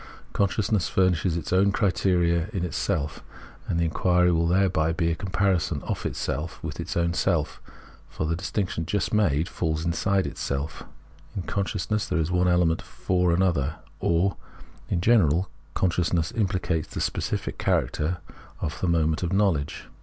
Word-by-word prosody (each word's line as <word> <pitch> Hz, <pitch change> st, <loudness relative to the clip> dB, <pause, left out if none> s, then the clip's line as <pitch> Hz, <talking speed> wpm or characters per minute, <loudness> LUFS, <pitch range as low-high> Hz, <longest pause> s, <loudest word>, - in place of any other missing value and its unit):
Consciousness 100 Hz, -1 st, +1 dB
furnislies 90 Hz, -2 st, +2 dB
its 85 Hz, +1 st, -3 dB
own 100 Hz, +2 st, +4 dB
criterion 90 Hz, -3 st, +2 dB
in 90 Hz, -4 st, -1 dB
itself, 75 Hz, -3 st, -2 dB, 0.5 s
and 85 Hz, -, 0 dB
the -, -, +2 dB
inquiry 90 Hz, +2 st, +3 dB
will 85 Hz, 0 st, +2 dB
thereby 90 Hz, -3 st, +2 dB
be 85 Hz, 0 st, 0 dB
a -, -, 0 dB
comparison 90 Hz, -5 st, 0 dB
of -, -, -2 dB
itself 80 Hz, +3 st, -3 dB
with -, -, -5 dB
its -, -, -3 dB
own 85 Hz, 0 st, +1 dB
self; 85 Hz, -4 st, 0 dB, 0.5 s
for -, -, -3 dB
the 80 Hz, +1 st, 0 dB
distinc 95 Hz, +2 st, -2 dB
tion, 80 Hz, -1 st, -3 dB
just 100 Hz, +3 st, -1 dB
made, 85 Hz, -7 st, +2 dB
falls 80 Hz, -3 st, -2 dB
inside 95 Hz, +3 st, +1 dB
itself. 70 Hz, +2 st, -3 dB, 0.5 s
In 95 Hz, -, -2 dB
consciousness 100 Hz, +3 st, -1 dB
there 90 Hz, -, 0 dB
is 80 Hz, +1 st, 0 dB
one 90 Hz, 0 st, +3 dB
element 90 Hz, -2 st, +3 dB
for 90 Hz, -1 st, 0 dB
an 90 Hz, +3 st, +3 dB
other, 80 Hz, -5 st, +1 dB, 0.2 s
or, 85 Hz, +4 st, +1 dB, 0.5 s
in 85 Hz, -, 0 dB
general, 90 Hz, -5 st, +3 dB, 0.2 s
con 90 Hz, -, +2 dB
sciousness 85 Hz, -1 st, 0 dB
impHcates 95 Hz, -6 st, 0 dB
the -, -, -6 dB
specific -, -, -2 dB
character 75 Hz, +8 st, 0 dB, 0.4 s
of 75 Hz, -1 st, -4 dB
the 90 Hz, -, +1 dB
moment 80 Hz, -2 st, +2 dB
of 90 Hz, -1 st, -1 dB
knowledge. 95 Hz, -8 st, +1 dB
90 Hz, 160 wpm, -26 LUFS, 80-95 Hz, 0.5 s, own